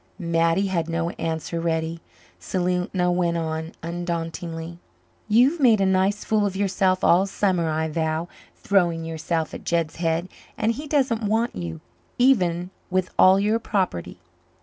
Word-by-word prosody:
Mattie 170 Hz, +1 st, +1 dB
had 170 Hz, -4 st, -1 dB
no 165 Hz, +1 st, -1 dB
answer 165 Hz, +1 st, -2 dB
ready. 165 Hz, 0 st, -1 dB, 0.4 s
Selena 180 Hz, 0 st, 0 dB
went 175 Hz, -1 st, +1 dB
on 160 Hz, 0 st, -3 dB
undauntedly. 170 Hz, 0 st, -4 dB, 0.5 s
"You've 250 Hz, +10 st, +4 dB
made 235 Hz, -6 st, +5 dB
a 195 Hz, -, +3 dB
nice 190 Hz, +2 st, +1 dB
fool 215 Hz, -1 st, +1 dB
of 195 Hz, -, -5 dB
yourself 190 Hz, -1 st, +1 dB
all 185 Hz, +3 st, +4 dB
summer, 185 Hz, -4 st, 0 dB
I 160 Hz, +1 st, 0 dB
vow. 160 Hz, +1 st, -1 dB, 0.3 s
Throwing 170 Hz, -5 st, +1 dB
yourself 160 Hz, 0 st, -2 dB
at -, -, -7 dB
Jed's 170 Hz, -2 st, -1 dB
head 165 Hz, +1 st, 0 dB, 0.3 s
and 220 Hz, +1 st, +1 dB
he 290 Hz, +6 st, -6 dB
doesn't 265 Hz, -6 st, +1 dB
want 225 Hz, +3 st, 0 dB
you, 85 Hz, -3 st, -5 dB, 0.4 s
even 180 Hz, -9 st, +2 dB, 0.2 s
with 185 Hz, 0 st, 0 dB
all 190 Hz, +1 st, +7 dB
your 210 Hz, +3 st, +1 dB
property." 190 Hz, -, -2 dB
175 Hz, 145 wpm, -24 LUFS, 165-195 Hz, 0.5 s, all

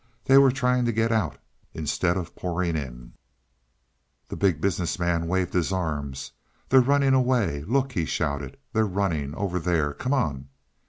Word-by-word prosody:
They 135 Hz, +1 st, +7 dB
were 135 Hz, -1 st, +6 dB
trying 125 Hz, -1 st, +1 dB
to 120 Hz, -, +1 dB
get 115 Hz, +1 st, +1 dB
out, 105 Hz, -9 st, 0 dB, 0.4 s
instead 85 Hz, +3 st, 0 dB
of 90 Hz, -3 st, -6 dB
pouring 85 Hz, -1 st, -2 dB
in. -, -, -6 dB, 1.2 s
The -, -, -5 dB
Big 95 Hz, -7 st, +1 dB
Business 90 Hz, -2 st, -1 dB
Man 85 Hz, -1 st, 0 dB
waved 90 Hz, 0 st, -1 dB
his 90 Hz, 0 st, +1 dB
arms. 75 Hz, -7 st, -3 dB, 0.4 s
"They're 130 Hz, 0 st, +7 dB
running 140 Hz, +1 st, +3 dB
away 125 Hz, -, +2 dB
look," 135 Hz, +5 st, +1 dB
he 85 Hz, -9 st, -1 dB
shouted. 70 Hz, -1 st, -3 dB, 0.2 s
"They're 110 Hz, -1 st, +2 dB
running 85 Hz, -7 st, -2 dB
over 95 Hz, -3 st, -2 dB
there 80 Hz, -4 st, 0 dB
come 130 Hz, -, -2 dB
on." 70 Hz, -, -2 dB
90 Hz, 160 wpm, -25 LUFS, 80-120 Hz, 1.2 s, They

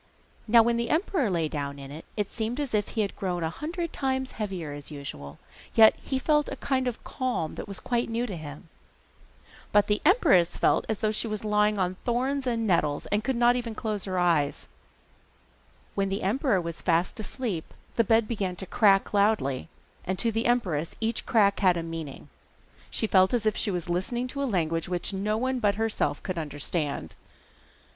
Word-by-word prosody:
Now 230 Hz, +1 st, +7 dB
when 235 Hz, +1 st, +1 dB
the 235 Hz, -1 st, -1 dB
emperor 320 Hz, -, +1 dB
lay 170 Hz, -4 st, +1 dB
down 140 Hz, -2 st, -4 dB
in 140 Hz, 0 st, -9 dB
it 155 Hz, +3 st, -9 dB
he 210 Hz, -, +1 dB
seemed 225 Hz, +5 st, -4 dB
as 285 Hz, -5 st, -3 dB
if 210 Hz, -1 st, +1 dB
he 220 Hz, -, -1 dB
had 200 Hz, -, -2 dB
grown 180 Hz, -3 st, -2 dB
a 160 Hz, -, -1 dB
hundred 335 Hz, -, -4 dB
times 265 Hz, -1 st, -1 dB
heavier 190 Hz, -8 st, -4 dB
than 145 Hz, +1 st, -7 dB
usual, 70 Hz, -, -8 dB, 0.4 s
yet 220 Hz, -1 st, +8 dB
he 265 Hz, -, -2 dB
felt 300 Hz, +2 st, +2 dB
a -, -, -4 dB
kind 260 Hz, -1 st, -1 dB
of 245 Hz, -, -4 dB
calm 250 Hz, -, -2 dB
that -, -, -7 dB
was 200 Hz, -1 st, -5 dB
quite 240 Hz, -1 st, -1 dB
new 230 Hz, +2 st, -1 dB
to 205 Hz, -6 st, -5 dB
him. 150 Hz, -3 st, -8 dB, 1.0 s
But 205 Hz, 0 st, +5 dB
the 210 Hz, 0 st, 0 dB
empress 295 Hz, -, +4 dB
felt -, -, +2 dB
as 220 Hz, 0 st, -2 dB
if 215 Hz, 0 st, +2 dB
she 220 Hz, -, 0 dB
was 215 Hz, -1 st, -4 dB
lying 210 Hz, 0 st, +2 dB
on 185 Hz, -1 st, 0 dB
thorns 260 Hz, +3 st, 0 dB
and 230 Hz, -2 st, 0 dB
nettles, 155 Hz, -7 st, +1 dB
and 210 Hz, +1 st, +1 dB
could 265 Hz, +1 st, 0 dB
not 240 Hz, +1 st, +4 dB, 0.2 s
close 215 Hz, -3 st, -3 dB
her 185 Hz, -2 st, -2 dB
eyes. 165 Hz, -5 st, +1 dB, 1.3 s
When 195 Hz, -1 st, 0 dB
the 195 Hz, +2 st, -2 dB
emperor 225 Hz, -, +2 dB
was 170 Hz, -1 st, -4 dB
fast 175 Hz, +4 st, +1 dB
asleep, 215 Hz, -6 st, -4 dB, 0.2 s
the 230 Hz, -, +4 dB
bed 225 Hz, 0 st, +3 dB
began 195 Hz, -6 st, -2 dB
to 190 Hz, -, -7 dB
crack 195 Hz, 0 st, +3 dB
loudly, 200 Hz, -, +1 dB, 0.3 s
and 190 Hz, +1 st, -2 dB
to 230 Hz, +4 st, +1 dB
the 225 Hz, +1 st, 0 dB
empress 180 Hz, -11 st, 0 dB
each 225 Hz, +1 st, -2 dB
crack 200 Hz, -3 st, +4 dB
had 185 Hz, -3 st, +4 dB
a 165 Hz, -, -2 dB
meaning. 165 Hz, -4 st, -7 dB, 0.6 s
She -, -, 0 dB
felt 190 Hz, +1 st, +4 dB
as 225 Hz, -2 st, -1 dB
if 215 Hz, -, +2 dB
she -, -, 0 dB
were 180 Hz, -3 st, 0 dB
listening 190 Hz, +8 st, -1 dB
to 280 Hz, +2 st, -4 dB
a -, -, +1 dB
language 165 Hz, -4 st, 0 dB
which 180 Hz, +2 st, -1 dB
no 210 Hz, +3 st, 0 dB
one 255 Hz, +2 st, 0 dB
but 205 Hz, -3 st, +2 dB
herself 220 Hz, 0 st, -1 dB
could 185 Hz, -4 st, -3 dB
understand. 145 Hz, -, -3 dB
210 Hz, 195 wpm, -27 LUFS, 175-235 Hz, 1.3 s, yet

